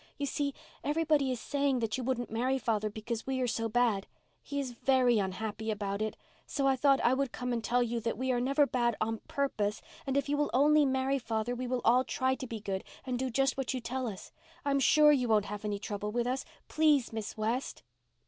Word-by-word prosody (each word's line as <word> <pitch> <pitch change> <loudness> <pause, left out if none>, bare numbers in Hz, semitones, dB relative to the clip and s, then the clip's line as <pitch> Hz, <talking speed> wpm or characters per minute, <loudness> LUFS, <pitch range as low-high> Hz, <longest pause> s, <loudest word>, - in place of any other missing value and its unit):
"You 285 - -1
see, 280 0 -2 0.3
everybody 300 -2 +2
is 250 - -2
saying 280 -1 0
that 225 -3 -1
you 260 - -3
wouldn't 245 -2 -2
marry 255 +4 +1
father 215 -4 0
because 220 +2 -5
we 265 -1 -1
are 255 - +1
so 225 -1 -1
bad. 225 -4 +1 0.3
He 285 - -4
is 265 -3 -3
very 245 -1 +3
unhappy 215 +3 -3
about 200 -1 -2
it. 215 0 -2 0.3
So 275 - -1
I 270 -1 +4
thought 275 +1 +4
I 245 - +4
would 270 -1 0
come 250 0 -3
and 230 -1 -2
tell 245 +2 +2
you 235 0 -2
that 230 0 -2
we 260 +1 0
are 245 -1 +1
never 275 +3 +3
bad 240 -4 +1
on 225 0 -1
purpose. 215 -7 -1 0.3
And 270 0 +1
if 280 - 0
you 290 +1 0
will 295 - +1
only 295 +2 +5
marry 265 +1 +1
father 225 0 -2
we 250 +1 -4
will 250 0 -1
all 250 +2 +5
try 260 0 0
to 260 0 -5
be 230 -2 -5
good 195 -2 -3 0.2
and 250 -2 -2
do 260 0 -1
just 270 +3 +1
what 265 0 -1
you - - -1
tell 250 +2 -3
us. 195 -4 -7 0.3
I'm 280 -1 +2
sure 300 +2 +6
you 255 -4 +2
won't 215 -2 +3
have 210 +1 -6
any 205 -1 -1
trouble 210 0 -4
with 240 +1 0
us. 255 +2 -2 0.2
Please, 300 -7 +3
Miss 220 -1 -5
West." 230 +5 -2
245 Hz, 230 wpm, -31 LUFS, 220-270 Hz, 0.3 s, sure